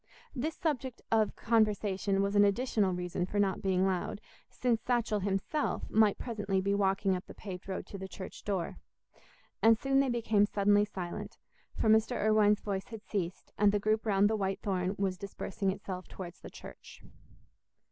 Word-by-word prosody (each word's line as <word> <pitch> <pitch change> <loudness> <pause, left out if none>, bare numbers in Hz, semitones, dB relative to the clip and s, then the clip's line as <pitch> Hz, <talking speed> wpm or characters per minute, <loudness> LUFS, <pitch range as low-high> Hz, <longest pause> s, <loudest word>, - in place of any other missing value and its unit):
This 295 +4 -2
subject 265 -6 -2
of 220 -2 +2
conversation 205 -3 +1
was 200 +1 -1
an 205 - +7
additional 205 -1 +2
reason 180 0 -2
for 205 - -4
not 195 -2 +1
being 190 -2 +2
loud, 190 +1 -1 0.3
since 235 -3 0
Satchell 235 -4 0
himself 195 +10 -1
might 215 -2 +4
presently 210 -5 -2
be 200 +1 0
walking 195 -1 +2
up 180 - -6
the - - -11
paved 185 -3 -8
road 190 - -3
to 200 - -8
the 190 - -5
church 185 0 -9
door. 195 -4 -2 0.8
And 225 0 +6
soon 270 +3 +2
they 275 -1 +2
became 220 -4 +2
suddenly 205 0 +3
silent; 185 -4 -6 0.4
for - - +1
Mr. 220 +3 +4
Irwine's 210 -1 +4
voice 195 -2 -3
had 225 -2 -9
ceased, 185 -4 -4
and 205 0 +5
the 205 - +2
group 215 +2 +1
round 200 -1 +4
the 220 - +1
white 195 -2 -2
thorn 190 -1 -1
was 190 -2 -1
dispersing 200 0 -3
itself 190 -1 -5
towards 180 -2 -8
the - - -10
church. - - -12
205 Hz, 175 wpm, -31 LUFS, 190-220 Hz, 0.8 s, an